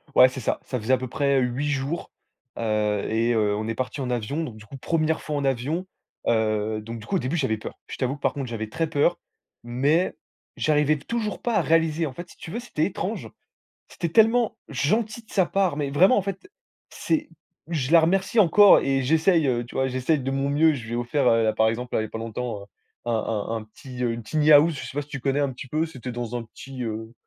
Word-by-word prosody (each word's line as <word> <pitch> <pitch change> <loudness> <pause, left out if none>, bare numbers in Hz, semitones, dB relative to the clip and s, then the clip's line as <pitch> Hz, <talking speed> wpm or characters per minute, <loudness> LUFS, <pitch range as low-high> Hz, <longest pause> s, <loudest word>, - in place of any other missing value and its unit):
Ouais, 125 - +9
c'est 130 - -7
ça, 115 - -1
ça 125 - -3
faisait 115 +4 +1
à 130 - +5
peu 130 - -5
près, 140 +2 +1
heu, - - +1
8 125 +4 -1
jours, 140 +4 -3 0.5
heu 105 -2 0
et 115 +2 +1
heu, 105 -2 +2
on 110 +1 -3
est 115 - -2
partis 130 +3 -3
en 130 - -3
avion. 125 +6 -2
Donc 125 -8 -6
du 110 - -13
coup, 135 - -10
1re 160 +3 0
fois 150 - -4
en 140 -1 -1
avion, 135 +7 -1 0.4
heu, 110 -1 +1
donc 115 +2 -7
du 105 - -11
coup, 195 - -2
au - - -1
début, 130 +3 -2
j'avais 130 -8 0
peur. 105 - -8
Je - - -7
t'avoue 130 +1 -1
que, 145 - -17
par - - +1
contre, 140 -3 -4
j'avais 110 -2 -4
très 165 +7 -1
peur, 165 +3 +2 0.4
mais 140 +9 +1 0.4
j'arrivais 150 0 +2
toujours 215 +6 -3
pas 240 -2 -1
à 195 - +4
réaliser. 165 0 +2
En 140 - -5
fait, 175 +6 -9
si - - -17
tu - - -9
veux, 235 - -3
c'était 245 - -1
étrange. - - -4 0.6
C'était 170 - -3
tellement 225 +3 +4
gentil 215 - 0
de 220 - -22
sa 190 -3 +4
part, 190 -6 +1
mais 145 -2 -2
vraiment, 180 - +5
en 205 - +2
fait, 195 - -6 0.4
c'est 315 -1 -1 0.4
je 150 -4 -2
la 170 - +8
remercie 190 +7 +1
encore 205 +2 +7
et 135 -1 +1
j'essaie, 160 +4 +3
heu, 120 -2 0
tu 120 - -13
vois, 130 - +2
j'essaie 130 +5 +1
de 135 0 -3
mon 135 +1 0
mieux, 155 +2 +4
je 125 -5 -6
lui 115 - -7
ai - - 0
offert, 120 +3 0
heu, 115 -1 +3
par 110 - +3
exemple, 120 +2 -3
là, - - +2
il - - -1
y - - -3
a - - -14
pas - - -5
longtemps, 115 -1 -4
heu, - - -13 0.4
un 120 - 0
un 110 0 -1
un 110 - -4
petit, 125 +3 -9
heu, 120 - +1
une 115 0 -5
tiny 155 +6 +1
house, 155 +3 +6
je - - -6
sais 125 - -7
pas 145 - -1
si 145 - -16
tu 135 - -6
connais, 135 +2 0
un 140 -1 +1
petit 130 +1 -9
peu, 155 +5 0
c'était 130 -6 -7
dans 120 -1 -5
un 120 - -3
petit, 130 +3 -9
heu, 110 0 -5
135 Hz, 255 wpm, -25 LUFS, 115-160 Hz, 0.6 s, Ouais